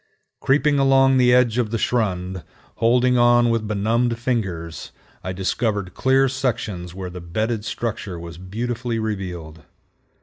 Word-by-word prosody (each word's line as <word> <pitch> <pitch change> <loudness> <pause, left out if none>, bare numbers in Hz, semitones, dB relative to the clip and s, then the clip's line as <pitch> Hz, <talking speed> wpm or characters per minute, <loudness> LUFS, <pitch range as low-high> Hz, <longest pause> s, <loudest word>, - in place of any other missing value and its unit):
Creeping 145 +1 +2
along 135 -1 +4
the 125 -1 +4
edge 125 -1 +3
of 115 -3 0
the 115 - -1
schrund, 95 -7 -1 0.3
holding 125 +2 +3
on 120 0 +5
with 115 -2 -1
benumbed 115 +3 0
fingers, 100 -10 -3 0.3
I 95 - -3
discovered 95 0 -2
clear 135 +1 +3
sections 110 -9 -3
where 95 -1 -6
the 90 0 -8
bedded 110 +6 -2
structure 105 -4 -4
was 85 0 -9
beautifully 115 +5 -3
revealed. 90 -7 -5
115 Hz, 135 wpm, -22 LUFS, 95-125 Hz, 0.3 s, on